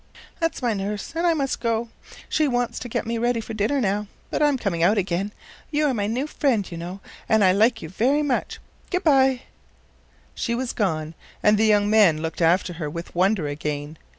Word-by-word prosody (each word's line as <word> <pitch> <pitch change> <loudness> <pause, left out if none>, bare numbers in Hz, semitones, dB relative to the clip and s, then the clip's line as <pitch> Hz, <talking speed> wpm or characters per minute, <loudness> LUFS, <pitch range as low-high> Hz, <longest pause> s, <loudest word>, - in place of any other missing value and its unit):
"That's 330 -5 -1
my 235 -2 +2
nurse, 205 +4 -4
and 335 +2 +1
I 335 - +3
must 275 -3 -1
go. 230 0 -1 0.4
She 310 -1 +1
wants 245 -2 -1
to 245 - -7
get - - -2
me 230 0 -2
ready 240 0 +1
for 225 0 -6
dinner 220 +7 0
now, 210 -2 0 0.2
but - - -1
I'm 295 -2 +3
coming 195 -8 -2
out 200 +6 +4
again. 190 +1 -1 0.4
You 300 0 +1
are 280 - +2
my 205 -3 -1
new 245 +6 -1
friend, 265 -9 0
you - - -5
know, 175 +4 -7 0.3
and 220 -1 +4
I 185 - +6
like 225 +4 +2
you 160 - -6
very 260 - +1
much. 275 -4 -1 0.3
Good 365 0 -1
by." 265 -4 +4 0.9
She 235 - -2
was 250 0 -3
gone, 160 -6 -1 0.3
and 210 0 +5
the 215 +1 +3
young 205 -1 +4
man 205 -7 +5
looked 160 +2 -4
after 175 +2 +3
her 150 - -2
with 170 +3 -7
wonder 185 -1 +2
again. 145 +1 -4
215 Hz, 205 wpm, -23 LUFS, 185-255 Hz, 0.9 s, I